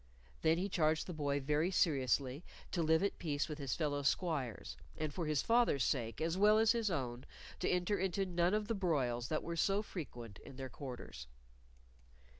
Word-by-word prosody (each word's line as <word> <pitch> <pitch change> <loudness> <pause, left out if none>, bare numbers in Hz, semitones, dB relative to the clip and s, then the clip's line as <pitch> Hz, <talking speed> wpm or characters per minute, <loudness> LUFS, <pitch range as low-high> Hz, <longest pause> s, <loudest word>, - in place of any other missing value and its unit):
Then 160 +1 +3
he 185 +3 0
charged 155 -4 +1
the 180 - -5
boy 145 -2 0
very 150 +5 +1
seriously 140 -4 +1 0.3
to 175 - 0
live 160 +2 +3
at 200 - -1
peace 145 -3 -1
with 150 -1 -6
his 140 -2 -2
fellow 145 -3 -1
squires, 140 - -1 0.2
and 155 -2 -2
for 170 -1 -2
his 150 -3 +1
father's 230 - +3
sake 115 -5 -1
as 165 +3 -1
well 210 +1 +6
as 225 0 +5
his 230 -3 +1
own 125 -7 -3 0.4
to - - 0
enter 180 +3 +1
into 190 +1 0
none 175 +1 +2
of 215 -1 -1
the 230 - 0
broils 135 - 0
that 155 - -1
were 170 - -3
so 195 +5 +2
frequent 120 - -7
in 135 - -12
their 130 0 -6
quarters. 125 - -8
155 Hz, 190 wpm, -36 LUFS, 135-185 Hz, 0.4 s, well